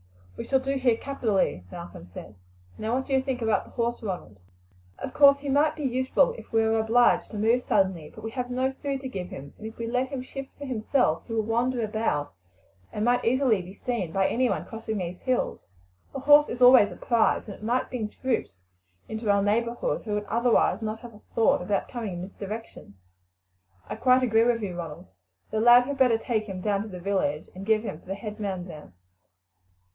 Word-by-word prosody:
"We - - -7
shall 265 - +3
do 265 +1 -2
here 250 -3 +2
capitally," 215 - -1
Malcolm 170 - -9
said. 90 +4 -10 0.4
"Now, 220 +3 -2
what 265 +1 -1
do 275 - -3
you 265 - +4
think 260 -3 -3
about 220 -1 +1
the - - -15
horse, 235 0 -2
Ronald?" 180 - -6 0.6
"Of - - -6
course 280 -1 +7
he 285 0 -6
might 300 +3 +3
be 305 - -6
useful 260 - +2
if - - -14
we 225 0 +3
were 220 0 +2
obliged 230 +2 +3
to 215 - -7
move 225 +4 +3
suddenly; 190 -9 0
but - - -11
we 225 - -4
have 250 0 -4
no 260 +1 0
food 275 0 -4
to 265 - -5
give 185 -8 -5
him, 140 +1 -9
and 220 - -6
if 220 - -10
we 230 - -4
let 250 +3 0
him 265 -1 -5
shift 270 +1 -8
for 285 - -7
himself 240 - +1
he 230 - -5
will 220 -1 +1
wander 235 +2 0
about, 210 -10 -1 0.6
and 210 - -2
might 245 0 +2
easily 245 -4 +2
be 180 +2 -11
seen 230 -10 -3
by 195 +2 +1
anyone 255 +1 0
crossing 225 -1 -5
these 180 -1 -4
hills. 255 - -1 0.5
A - - -2
horse 295 +2 +6
is 250 +1 0
always 245 -5 +8
a - - -8
prize, 235 +2 +1
and 205 - -6
it 210 - -14
might 240 +3 0
bring 225 -4 -3
troops 230 - -2 0.5
out - - -15
into 220 0 -3
our 200 -1 +4
neighbourhood 235 +4 0
who 210 -2 -2
would 210 - -1
otherwise 230 -2 +2
not 220 0 -4
have 240 -2 -10
a 210 - -16
thought 225 -5 +3
about 195 +2 -1
coming 230 -6 -5
in 175 - -5
this 195 - -9
direction." 210 - -8 0.9
"I - - -4
quite 255 0 +4
agree 225 -2 +4
with 235 -2 +1
you, 185 -3 -4
Ronald. 165 -4 -7 0.5
The 220 - 0
lad 240 +1 +8
had 275 +2 -5
better 250 -4 +5
take 225 -2 -1
him 190 -1 -5
down 200 +1 0
to 215 - -6
the 185 -4 -8
village, 175 -6 -1
and 195 +2 -9
give 220 0 +3
him 195 -8 -5
to - - -23
the 195 - -3
head 210 +1 -7
man 190 -4 -3
there. 150 - -11
225 Hz, 220 wpm, -26 LUFS, 200-250 Hz, 0.9 s, always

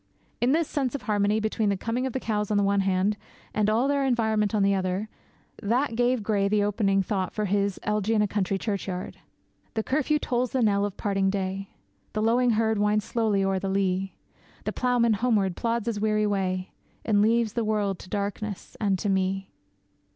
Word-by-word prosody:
It 240 - +3
is - - +4
this 330 -2 +1
sense 275 -3 -1
of 285 - -5
harmony 210 0 +1
between 220 -1 0
the 200 - 0
coming 235 +6 -1
of 255 - -5
the 260 - -1
cows 210 -4 -1
on 210 - +2
the 205 - +3
one 200 0 +2
hand, 195 +2 +1 0.4
and 210 -1 +2
all 230 +5 +2
their 280 0 +1
environment 220 -4 +1
on 205 - +3
the 200 0 +3
other, 190 +2 -1 0.5
that 235 +4 0
gave 245 -1 +1
Gray 200 -2 +1
the 205 0 +2
opening 200 -1 +1
thought 190 -1 -2
for 215 - -1
his 200 0 0
'Elegy 210 +1 0
in 210 - +3
a - - +1
Country 195 -1 -1
Churchyard': 195 -3 -4 0.6
The 220 - 0
curfew 300 +4 +1
tolls 250 -3 -1
the 260 -2 +2
knell 200 -2 +3
of 205 - -5
parting 195 -2 +1
day, 195 0 -3 0.4
The 215 - -1
lowing 240 +2 +3
herd 220 -1 +1
winds 210 0 +2
slowly 215 -4 +1
o'er 195 0 +1
the 195 - -3
lea, 190 0 0 0.5
The - - -3
ploughman 245 -2 +2
homeward 205 -5 +1
plods 230 -2 -1
his 230 -3 -2
weary 215 0 +2
way, 185 -2 -1 0.3
And 205 -2 +3
leaves 225 0 +2
the 235 - 0
world 210 -3 0
to 185 - -12
darkness 205 0 -4
and 200 -3 +2
to 205 - -3
me. 190 0 0
210 Hz, 200 wpm, -26 LUFS, 195-230 Hz, 0.6 s, is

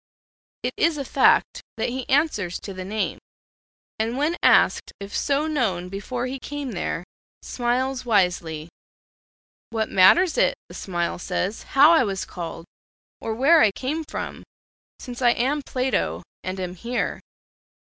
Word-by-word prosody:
It - - -1
is 330 -2 +2
a 280 - -3
fact - - +3 0.2
that - - -1
he 255 +1 -5
answers 260 - +1
to 195 - -7
the 185 0 -6
name, 210 +2 -2 0.8
and 225 +3 -1
when 300 +4 +1
asked - - +4
if 200 0 -7
so 285 +1 +1
known 215 - -1
before 240 +6 -4
he 260 +1 -4
came 285 -1 -5
there, 175 -3 -3 0.4
smiles 255 +2 -1
wisely. 180 -8 +1 1.0
"What 220 -1 -1
matters 330 - +5
it," - - +3
the - - -11
smile 175 -3 -3
says, 195 +3 -2 0.2
"how 295 +4 +9
I 325 -5 +5
was 195 -4 -2
called, 165 -2 -7 0.5
or 220 - -3
where 300 +7 +5
I 215 - +5
came 290 +9 -3
from, - - -6 0.6
since 245 -1 -8
I 240 -1 +5
am 275 +5 0
Plato, 255 -4 -1 0.2
and 185 +1 -4
am 180 -1 -4
here?" 235 +7 -3
240 Hz, 145 wpm, -24 LUFS, 190-275 Hz, 1.0 s, how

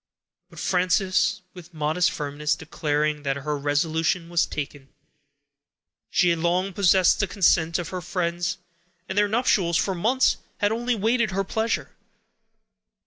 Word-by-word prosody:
But - - -16
Frances, 185 0 +1
with 175 -2 -13
modest 155 +4 +1
firmness, 150 +1 -2
declared 150 -2 -2
that 135 -1 -1
her 150 +2 -3
resolution 160 +4 0
was 170 -1 +2
taken; 140 -2 -6 1.2
she 180 - +3
had 170 -1 +1
long 180 +3 0
possessed 185 -1 +4
the 205 - +1
consent 170 -4 +2
of 175 -2 -4
her 185 -1 -5
friends, 175 -1 -2 0.5
and 190 - -5
their 205 0 +3
nuptials, 200 -6 +2
for 190 - 0
months, 230 +9 +2 0.2
had 205 0 +1
only 240 +2 0
waited 225 +2 +1
her 195 +1 -1
pleasure. 220 +4 -2
175 Hz, 140 wpm, -24 LUFS, 155-195 Hz, 1.2 s, possessed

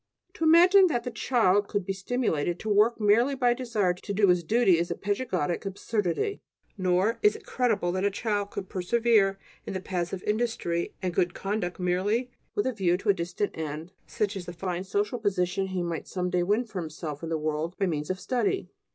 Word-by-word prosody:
To - - -5
imagine 360 +4 +7
that 240 -8 -1
the 245 - -4
child 205 -6 +2
could 205 -3 -2
be 195 - -1
stimulated 190 - -1
to 220 - -4
work 215 +3 +4
merely 225 +6 +3
by 250 -2 +3
a - - +1
desire 225 -7 0
to 195 +3 -6
do 200 -1 +4
his 180 -1 +3
duty 195 -2 +3
is 170 - -1
a - - -2
"pedagogic 190 -6 -1
absurdity"; 205 - -2 0.3
nor 185 +4 +1
is 420 0 +4
it 440 -2 -11
credible 220 - 0
that 185 +1 -1
a 200 - +3
child 205 0 -2
could 190 - -6
persevere 200 +1 +2 0.3
in - - -3
the - - -1
paths 180 -2 -3
of 190 - -5
industry 210 -6 -1
and 180 -1 -1
good 175 +1 +1
conduct 195 -3 -3
merely 200 +8 0 0.2
with 205 - +1
a 260 - 0
view 180 -5 +1
to 205 - -3
a - - +7
distant 180 +3 -3
end, 160 +2 -5 0.2
such 210 -1 -1
as 185 -2 -6
the 175 - -6
fine 180 0 -3
social 205 +5 -1
position 190 -2 0
he 185 -2 -2
might 170 -2 -4
some 180 -1 -2
day 180 - +2
win 205 +7 +2
for 200 -5 -5
himself 155 -2 -6
in 165 - -5
the 165 - 0
world 155 +3 -2
by 195 - +1
means 150 -4 -2
of 185 0 -2
study. 375 - -1
195 Hz, 210 wpm, -27 LUFS, 180-230 Hz, 0.3 s, imagine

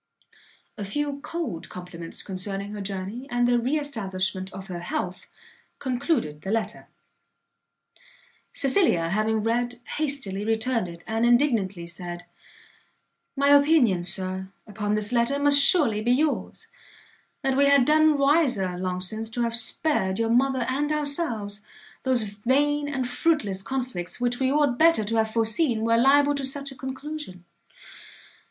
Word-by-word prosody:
A - - -3
few 285 +7 -3
cold 300 - -5
compliments 175 -2 -6
concerning 195 +1 -4
her 210 - -6
journey, 200 +6 -5
and 245 0 +1
the 245 0 +3
re 260 +6 0
establishment 190 -8 -3
of 190 0 -9
her 180 -3 -6
health, 180 +1 -4 0.5
concluded 250 - -2
the 190 - -6
letter. 225 +1 -3 1.6
Cecilia, 265 - +2
having 215 +3 0
read, 240 +1 -1 0.2
hastily 275 -10 -2
returned 225 0 0
it, 170 0 -11
and 225 +1 -1
indignantly 235 -8 +2
said, 175 0 -7 1.1
"My 280 0 +2
opinion, 285 - +4
Sir, 185 +1 -3 0.2
upon 210 0 -2
this 210 +1 -1
letter, 240 +3 +1
must 285 0 +6
surely 275 - +5
be 240 +3 +2
yours; 295 +3 -1 0.8
that 270 -1 +1
we 280 +1 +4
had 280 -3 +5
done 310 0 +4
wiser, 275 - +2
long 185 0 -3
since, 220 +4 -3
to 240 +2 -2
have 230 0 -1
spared 235 -6 0
your 230 0 0
mother 260 0 +2
and 290 +3 -1
ourselves, 285 -9 -2 0.4
those 255 -3 +1
vain 275 +8 0
and 260 -3 -2
fruitless 250 - 0
conflicts 250 -7 -4
which 245 0 0
we 265 0 +1
ought 285 -4 +1
better 330 -8 +5
to 225 +2 -1
have 220 0 +2
foreseen 225 +2 +1
were 230 0 +3
liable 285 +4 +4
to 280 -1 -3
such 275 +1 -3
a - - -11
conclusion. 265 - -7
235 Hz, 145 wpm, -25 LUFS, 195-280 Hz, 1.6 s, must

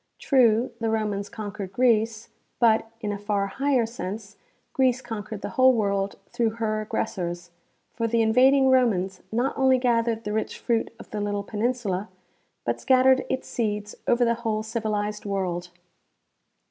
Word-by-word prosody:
True, 245 -3 +3
the 225 -1 0
Romans 210 -2 -1
conquered 205 -4 -6
Greece, 225 -1 +2 0.3
but, 225 -1 +3
in 210 -2 -2
a 200 - -4
far 205 -1 0
higher 260 +4 +1
sense, 205 -2 -6 0.4
Greece 255 -2 +2
conquered 220 -4 -6
the - - -3
whole 260 0 +5
world 200 -2 0 0.2
through 225 -2 0
her 215 -1 -1
aggressors, 175 -5 -3 0.4
for 230 0 -1
the 230 0 +2
invading 265 +4 +5
Romans 195 -8 +2
not 245 +5 0
only 265 -1 +4
gathered 230 -2 +1
the 210 - -3
rich 220 - -2
fruit 230 -2 -1
of - - -13
the 210 - -3
little 205 0 -2
peninsula 210 -2 -2 0.6
but - - -1
scattered 260 0 +4
its 260 0 -2
seeds 210 -2 -2
over 240 0 +3
the 235 - +3
whole 215 -2 -1
civilized 215 -2 -2
world. 180 -3 -2
220 Hz, 150 wpm, -25 LUFS, 205-240 Hz, 0.6 s, whole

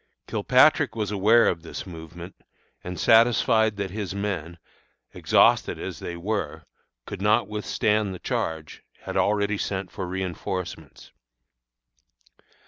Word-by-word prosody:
Kilpatrick - - +3
was 105 -2 -2
aware 105 +4 +4
of 85 - -1
this 80 - -7
movement, 85 +1 -10 0.5
and 90 -1 -6
satisfied 110 -2 +4
that 100 -2 -3
his 100 -2 -5
men, 90 -5 -4 0.6
exhausted - - +3
as - - -6
they 85 - -6
were, 95 -3 -3 0.4
could - - -7
not 105 +1 +3
withstand 105 -1 0
the 95 - -6
charge, 80 -3 -4 0.2
had - - -7
already 105 0 +1
sent 95 -2 -3
for 95 -4 -5
reënforcements. 90 -3 -5
95 Hz, 120 wpm, -25 LUFS, 85-105 Hz, 0.6 s, aware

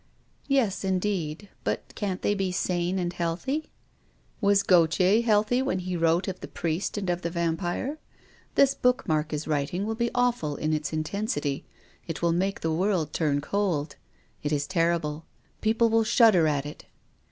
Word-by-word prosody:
" - - -39
Yes, 260 -10 +1
indeed. 190 -2 -1 0.2
But - - -3
can't 195 -3 -3
they 205 - +2
be 195 -2 -1
sane 180 0 0
and 175 -1 -1
healthy? 180 - -2 0.4
" - - -37
Was 200 -1 +4
Gautier 180 +4 +4
healthy 220 +2 +2
when 265 -7 0
he 185 0 -3
wrote 165 +2 +2
of 185 -1 -4
the - - -7
Priest 170 +5 -2
and 200 -2 -3
of 175 0 0
the 170 - -2
Vampire? 175 - -2 0.6
This 275 -1 +5
book 250 0 +1
Mark 155 0 0
is 150 0 -3
writing 155 +6 -1
will 220 - -1
be 235 +1 0
awful 245 - +1
in 155 +2 -1
its 150 -2 -2
intensity. 155 -3 -2 0.4
It 165 0 -5
will 170 - +3
make 190 +3 -1
the 160 -1 0
world 175 -3 0
turn 145 -3 +1
cold. 165 -5 -1 0.5
It 145 - -2
is 145 -1 0
terrible. 165 -3 0 0.3
Peo 220 0 +2
ple 230 0 +4
will 225 0 +3
shudder 215 -7 +5
at 145 -2 0
it." 145 - -9
180 Hz, 175 wpm, -27 LUFS, 160-205 Hz, 0.6 s, This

